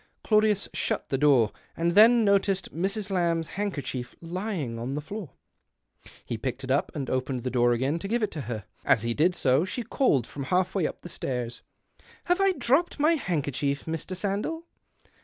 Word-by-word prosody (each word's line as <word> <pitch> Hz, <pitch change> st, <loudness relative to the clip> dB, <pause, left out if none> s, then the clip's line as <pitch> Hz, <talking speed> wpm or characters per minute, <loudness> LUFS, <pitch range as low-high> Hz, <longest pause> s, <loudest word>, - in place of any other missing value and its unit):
Claudius 215 Hz, -2 st, +3 dB
shut -, -, -2 dB
the 135 Hz, -, +1 dB
door, 135 Hz, -7 st, +4 dB, 0.3 s
and 170 Hz, +1 st, +1 dB
then 225 Hz, +3 st, +7 dB
noticed 195 Hz, -1 st, +1 dB
Mrs. 195 Hz, +4 st, -2 dB
Lamb's 170 Hz, -3 st, +1 dB
handkerchief 145 Hz, -11 st, -4 dB
lying 170 Hz, -, -4 dB
on 125 Hz, +4 st, -3 dB
the -, -, -1 dB
floor. 165 Hz, -, -7 dB, 0.9 s
He 115 Hz, -, -4 dB
picked 130 Hz, +2 st, -4 dB
it 130 Hz, -, -3 dB
up, 140 Hz, -, +1 dB
and 140 Hz, -3 st, -3 dB
opened 130 Hz, -1 st, -2 dB
the 125 Hz, -, -2 dB
door 120 Hz, -1 st, +3 dB
again 135 Hz, +7 st, 0 dB
to 195 Hz, -, -5 dB
Sfive 235 Hz, +2 st, +1 dB
it 215 Hz, -, -1 dB
her. 120 Hz, -, -5 dB, 0.2 s
As 110 Hz, -, +3 dB
he 115 Hz, 0 st, 0 dB
did 170 Hz, +7 st, +2 dB
so, 135 Hz, +1 st, +3 dB
she 190 Hz, +6 st, -3 dB
called 220 Hz, -, +2 dB
from 140 Hz, +1 st, -6 dB
halfway 185 Hz, +2 st, +1 dB
up -, -, -8 dB
the -, -, -7 dB
stairs 125 Hz, -7 st, -4 dB, 0.2 s
— -, -, -33 dB
" -, -, -26 dB
Have 355 Hz, +2 st, +1 dB
I 390 Hz, -1 st, +4 dB
dropped 280 Hz, +4 st, +1 dB
my 305 Hz, +3 st, +4 dB
handkerchief, 145 Hz, -, -1 dB
Mr. 165 Hz, +3 st, -4 dB
Sandell 205 Hz, -, -2 dB
165 Hz, 185 wpm, -27 LUFS, 130-205 Hz, 0.9 s, then